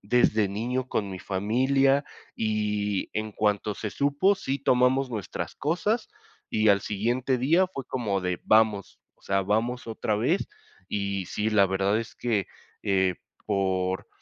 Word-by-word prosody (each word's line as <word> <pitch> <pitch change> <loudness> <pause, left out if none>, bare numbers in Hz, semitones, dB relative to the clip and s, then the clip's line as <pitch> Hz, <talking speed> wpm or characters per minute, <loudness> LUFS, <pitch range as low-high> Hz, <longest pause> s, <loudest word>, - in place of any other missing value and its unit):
desde 110 -1 +3
niño 120 +6 -2
con 100 -5 -1
mi 95 - -6
familia, 130 +9 +2 0.3
y 105 -2 -1
en 110 0 -3
cuanto 105 0 0
se 105 - -4
supo, 145 +8 +2
sí 135 -4 -2
tomamos 130 0 +2
nuestras 95 -6 -5
cosas, 185 - 0 0.4
y 110 0 +2
al 100 -1 +4
siguiente 120 +6 0
día 165 +9 +3
fue 140 -8 -7
como 105 -8 -2
de: 90 -1 -2
"Vamos", 110 -3 +2 0.2
o - - -35
sea, 95 0 +1
"Vamos 115 +6 -1
otra 110 -1 -1
vez", 105 - 0 0.4
y 100 -2 -2
sí, 105 +5 -1
la 100 -2 +5
verdad 95 +2 +1
es 115 -1 -6
que, 110 -6 -1 0.4
eh, 95 -2 +2 0.3
por, 95 -1 -1
110 Hz, 150 wpm, -27 LUFS, 100-125 Hz, 0.4 s, la